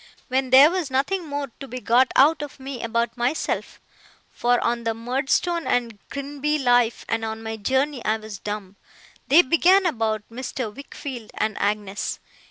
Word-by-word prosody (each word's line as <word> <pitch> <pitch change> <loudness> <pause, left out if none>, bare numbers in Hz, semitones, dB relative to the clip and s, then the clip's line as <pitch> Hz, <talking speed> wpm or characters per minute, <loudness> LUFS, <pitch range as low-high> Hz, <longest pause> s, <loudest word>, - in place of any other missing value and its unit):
When 260 0 0
there 270 +5 +8
was 360 -5 -2
nothing 315 +7 -1
more 285 -2 -4
to 275 - -7
be 255 0 -6
got 250 +2 +3
out 295 +3 +5
of 290 -1 -7
me 265 -2 -6
about 235 0 -1
myself 245 +5 -2 0.5
(for 245 0 +1
on 235 0 0
the 225 -1 -1
Murdstone 270 +8 0
and 230 -4 0
Grinby 285 +2 -2
life, 245 -4 +2
and 225 0 -1
on 220 0 -4
my 220 0 -4
journey, 265 +5 0
I 215 +1 +1
was 215 -2 -9
dumb), 205 -2 -6 0.5
they 330 +6 +7
began 365 +6 +4
about 220 -9 0
Mr. 245 -2 -5
Wickfield 265 -4 -8
and 215 -2 -1
Agnes. 205 -1 -2
250 Hz, 165 wpm, -23 LUFS, 225-280 Hz, 0.5 s, there